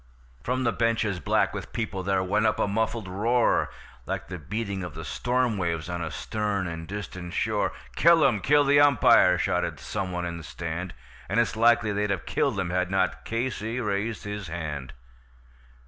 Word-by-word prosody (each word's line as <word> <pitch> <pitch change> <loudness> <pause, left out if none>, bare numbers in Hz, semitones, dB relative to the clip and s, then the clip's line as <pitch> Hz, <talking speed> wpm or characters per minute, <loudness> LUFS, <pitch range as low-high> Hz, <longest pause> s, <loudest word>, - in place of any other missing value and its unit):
From 130 +1 -1
the 120 - +2
benches, 115 -5 0
black 75 - +1
with - - -6
people, 105 -4 -3
there 95 0 +1
went 105 +4 +2
up 110 - +1
a - - +2
muffled 110 0 -1
roar, 115 +6 +2 0.4
Like - - -4
the 90 -1 -5
beating 100 +3 -4
of 90 - -7
the 80 0 -7
storm 125 +2 0
waves 85 -2 -2
on 85 -1 -3
a 85 - -3
stern 100 +4 -2
and 80 -1 -5
distant 95 -3 -6
shore; - - 0 0.2
"Kill 170 -1 +6
him! 120 -6 +3
Kill 145 +8 +4
the 145 +1 +5
umpire!" 130 -10 +6
shouted - - -1
some 95 -3 -4
one 90 0 -2
in 85 -1 -4
the 85 - -9
stand. 85 +3 -5 0.3
And 100 +5 +2
it's 115 - +1
likely 115 -1 +4
they'd 105 0 0
have 95 -4 -2
killed - - 0
him 90 -2 -1
had 90 0 0
not 95 -1 0
Casey 115 0 -2
raised 105 0 -2
his 105 -2 -5
hand. 75 -5 -5
100 Hz, 185 wpm, -26 LUFS, 90-115 Hz, 0.4 s, Kill